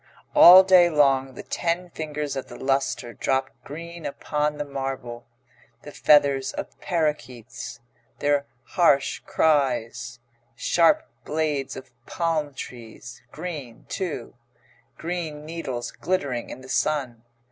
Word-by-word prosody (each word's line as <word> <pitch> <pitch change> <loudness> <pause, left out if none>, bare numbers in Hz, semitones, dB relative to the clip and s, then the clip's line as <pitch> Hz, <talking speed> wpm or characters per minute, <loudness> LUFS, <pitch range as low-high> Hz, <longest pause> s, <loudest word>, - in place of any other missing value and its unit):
All 185 +2 +10
day 185 -2 +6
long 135 -4 +2
the - - -8
ten 175 +1 -2
fingers 150 -2 -4
of 135 - -5
the - - -10
lustre 135 -3 -1
drop 135 +3 -1
green 170 +3 -8
upon 150 +1 -2
the 145 - -3
marble. 135 -4 -5 0.6
The 145 - -9
feathers 140 -3 +3
of - - -7
parakeets 125 -8 -3 0.4
their 145 -1 +1 0.2
harsh 140 -6 +2
cries 125 -9 +1 0.4
sharp 235 - +3 0.2
blades 150 -3 -2
of 130 -1 -10 0.2
palm 155 -4 -1
trees 120 0 -9
green, 145 -10 -7
too; 180 -5 -4 0.6
green 160 -3 -4
needles 135 -7 -5
glittering 140 -10 -2
in - - -8
the 130 - -12
sun. 130 -5 -1
145 Hz, 115 wpm, -24 LUFS, 130-165 Hz, 0.6 s, All